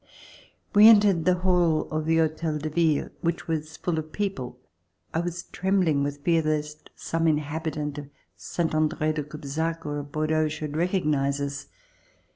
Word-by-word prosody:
We 210 +1 +9
entered 205 -6 +6
the 180 0 +4
hall 175 -4 +3
of 155 0 -2
the 165 0 +3
Hotel 160 -1 0
de 155 +1 -4
Ville 160 -2 +1
which 170 0 -2
was 160 -1 -3
full 170 -3 -1
of 155 0 -7
people. 165 -13 -3 0.6
I 160 - +1
was 175 0 -3
trembling 185 -6 +1
with 145 0 -3
fear 165 0 +3
lest 150 0 -3
some 165 0 -1
in 155 -2 +4
habitant 150 -1 -4
of 140 -1 -9 0.3
Salnt 170 -2 -3
Andre 155 0 +1
de 155 - -2
Cubzac 155 +3 -4
or 145 0 -3
of 145 0 -8
Bordeaux 155 +1 +1
should 150 -1 -5
recognize 150 -5 +1
us. 140 0 -4
155 Hz, 165 wpm, -26 LUFS, 150-165 Hz, 0.6 s, We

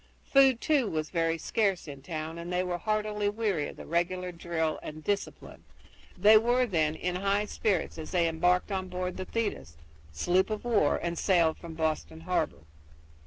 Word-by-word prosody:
Food, 270 -3 +5
too, 280 -8 +2
was 155 -1 -3
very 165 -1 +1
scarce 195 0 0
in 140 -2 -8
town, 160 +3 -5
and 170 +1 -6
they 180 0 +1
were 175 -1 -3
heartily 210 -1 0
weary 205 -8 -1
of - - -10
the - - -10
regular 180 +2 -1
drill 165 -2 -2
and 155 0 -8
discipline. 200 +3 -4 0.5
They 215 +1 +7
were, 245 +3 +2
then, 160 -7 +1
in 180 +2 -2
high 200 +2 +1
spirits 195 -6 -1
as 155 - -6
they 175 -2 +2
embarked 175 +4 +1
on 190 -1 -2
board 180 0 -4
the 185 - -4
Thetis 80 - -3 0.3
sloop 180 - +1
of 215 +2 -4
war 220 -11 +3
and 170 -1 -3
sailed 170 -4 +3
from 165 -2 -9
Boston 120 - -2
harbor. 80 - -1
180 Hz, 175 wpm, -29 LUFS, 160-205 Hz, 0.5 s, They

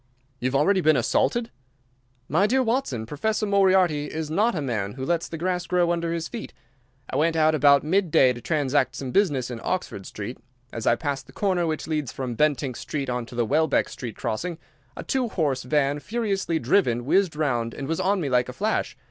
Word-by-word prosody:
"You 125 - 0
have 130 - -2
already 185 +7 +3
been 155 -3 +4
assaulted?" 230 - +1 0.8
"My 175 +8 +3
dear 260 +4 +2
Watson, 225 - -1
Professor 215 - -1
Moriarty 190 -6 +3
is 155 -1 -4
not 215 +7 +2
a - - -1
man 105 -7 -2
who 130 0 -5
lets 170 +1 -1
the 165 - -5
grass 180 +1 -2
grow 175 -1 +2
under 170 -1 -1
his 165 -1 -2
feet. 235 -2 -8 0.6
I 130 - -1
went 165 +3 +2
out 155 0 +4
about 140 -1 +5
midday 160 -6 +3
to 120 - -9
transact 140 -3 +1
some 130 -2 -5
business 145 -11 +1
in 115 -2 -6
Oxford 180 - -3
Street. 105 +5 -7 0.3
As 115 - -4
I 120 - +5
passed 140 0 -4
the - - -15
corner 185 -4 0
which 155 -1 -2
leads 150 -6 -2
from 130 -2 -4
Bentinck 140 -1 0
Street 140 -4 -3
on 125 -1 -3
to 120 - -11
the 120 -1 +1
Welbeck 155 +4 +2
Street 120 -4 -7
crossing 170 +10 -3 0.4
a - - -5
two 260 -3 0
horse 145 -9 0
van 140 +2 +1
furiously 195 -3 -1
driven 120 -4 +1
whizzed 185 +2 +2
round 120 -7 -1
and 135 - -5
was 165 +2 -1
on 195 +1 +1
me 155 - -2
like 125 -1 +1
a - - -6
flash. 215 - -1
155 Hz, 205 wpm, -25 LUFS, 130-185 Hz, 0.8 s, about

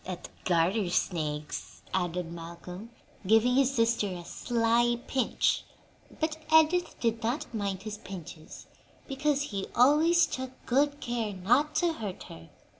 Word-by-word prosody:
"At 180 -1 -7 0.2
garter 180 +3 +2
snakes," 155 -4 -2
added 180 -2 -1
Malcolm, 170 +5 -8 0.4
giving 225 +4 +5
his 270 +1 +3
sister 230 -3 +2
a 180 -3 -6
sly 240 +2 +1
pinch; 260 -3 +1 0.6
but 315 0 -1
Edith 320 +3 +4
did 230 -1 0
not 245 +5 -2
mind 200 -3 -3
his 215 -1 -6
pinches, 170 -4 -10 0.4
because 285 +1 0
he 195 -1 -2
always 310 +7 +5
took 260 0 -4 0.2
good 285 +3 +2
care 235 -3 -2
not 245 +11 +2
to 345 -2 +2
hurt 205 -10 -6
her. 80 0 -12
225 Hz, 130 wpm, -29 LUFS, 180-270 Hz, 0.6 s, giving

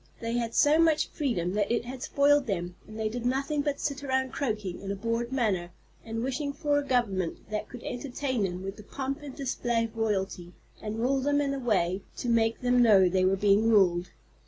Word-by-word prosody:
They 230 0 -3
had 235 -1 -2
so 300 +1 +5
much 320 -2 +3
freedom 190 - -1
that 205 +1 0
it 235 0 0
had 255 +1 -7
spoiled 285 0 +3
them, 175 -3 -3
and 215 - -10
they 220 -1 -1
did 235 +2 -4
nothing 275 +4 0
but 285 -1 -2
sit 280 -1 -3
around 265 -1 0
croaking 210 -10 -3
in 195 0 -4
a - - -2
bored 230 +4 -2
manner 205 -9 0 0.3
and 225 0 -4
wishing 280 +2 -2
for 290 -1 +1
a - - -3
government 210 -8 -1
that 210 0 -3
could 245 -1 -10
entertain 255 -1 -3
them 185 -1 -2
with 195 +1 -5
the 210 - -11
pomp 275 +6 -4
and 285 -3 -8
display 240 -4 -1
of 225 0 -6
royalty, 190 -5 -2 0.3
and 215 0 -4
rule 270 +3 +2
them 285 +2 +2
in 280 -1 0
a 275 - -3
way 195 -6 +1 0.2
to 245 - -3
make 225 -1 +2
them 245 0 +3
know 200 -5 +6
they 185 +1 +2
were 190 +1 +3
being 205 +3 +3
ruled. 180 -4 +3
230 Hz, 215 wpm, -28 LUFS, 200-270 Hz, 0.3 s, know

